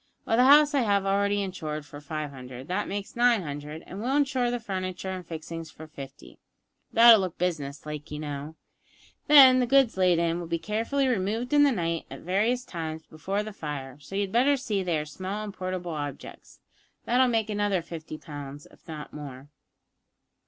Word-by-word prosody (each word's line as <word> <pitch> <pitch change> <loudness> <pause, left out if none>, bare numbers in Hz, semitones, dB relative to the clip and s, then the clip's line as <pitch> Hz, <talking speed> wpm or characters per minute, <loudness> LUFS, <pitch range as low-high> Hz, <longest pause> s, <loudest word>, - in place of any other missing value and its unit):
Well, 225 - +1
the 250 +2 +5
house 290 +2 +7
I 280 - +3
have 200 -5 +2
already 200 +1 +1
insured 155 -6 -5
for 145 +1 -11
five 150 0 -5
hundred, 130 0 -10
that 185 +3 -1
makes 200 0 -5
nine 240 -4 +3
hundred, 150 +1 -7
and 195 +3 -8
we'll 260 +4 0
insure 265 -4 +1
the 245 0 -2
furniture 190 -3 -4
and 185 -1 -5
fixings 165 0 -7
for 160 - -11
fifty; 140 -2 -11 0.5
that'll 230 -1 +8
look 185 -3 -3
business 150 -6 -3
like, 150 0 -6
you 150 - -5
know. 150 +1 -6 0.7
Then 270 -4 +9
the 250 - +1
goods 270 -5 +4
laid 180 -2 +4
in 170 0 0
will 175 - -6
be 170 0 -1
carefully 230 +9 -1
removed 230 +3 -1
in 290 - +6
the 290 -1 +5
night 170 -6 -2
at - - -9
various 220 +8 0
times 160 -4 -6
before 195 +7 -3
the 215 0 -7
fire, 145 -6 -6
so 150 +7 -10
you 200 - +1
had 195 -2 -2
better 270 +5 +3
see 220 -7 -2
that - - -5
they 170 -3 +1
are 150 - -3
small 185 +7 -5
and 205 -2 -6
portable 185 -2 -4
objects; 145 -2 -7 0.4
that'll 255 +2 +4
make 225 -3 0
another 205 -4 0
fifty 160 -2 -8
pounds, 145 -2 -9
if - - -22
not 155 -2 -8
more. 140 -2 -9
185 Hz, 195 wpm, -27 LUFS, 155-225 Hz, 0.7 s, Then